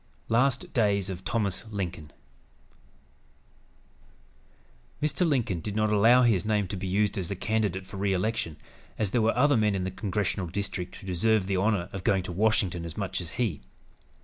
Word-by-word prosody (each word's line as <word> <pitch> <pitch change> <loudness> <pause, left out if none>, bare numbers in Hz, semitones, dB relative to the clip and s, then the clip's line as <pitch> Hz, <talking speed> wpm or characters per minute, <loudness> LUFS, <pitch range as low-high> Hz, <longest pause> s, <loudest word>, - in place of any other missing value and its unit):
LAST 135 +9 +1
DAYS 100 -6 +1
OF 90 - -5
THOMAS 105 0 -1
LINCOLN 90 -7 -5 2.9
Mr. 155 +4 +1
Lincoln 120 - 0
did 105 +4 -5
not 110 0 +2
allow 115 +5 +6
his 110 -7 +3
name 105 -2 +1
to 100 - -3
be 95 0 -4
used 100 +2 +1
as 90 - -3
a 100 - -2
candidate 100 -2 -1
for 95 +1 -9
re 100 0 0
election, 95 -4 -1 0.4
as 105 -3 -1
there 120 - +2
were 115 +2 +2
other 145 +2 +4
men 105 -3 +2
in 95 - -1
the 95 - -2
congressional 100 -1 -2
district 95 0 -4
who - - -11
deserved 95 +2 +1
the 100 -1 0
honor 100 -2 +1
of 95 -2 -5
going 95 -1 +2
to 90 - -5
Washington 95 -3 +1
as 85 -1 -7
much 95 -2 -2
as 85 - -6
he. 110 - -1
100 Hz, 175 wpm, -28 LUFS, 95-110 Hz, 2.9 s, allow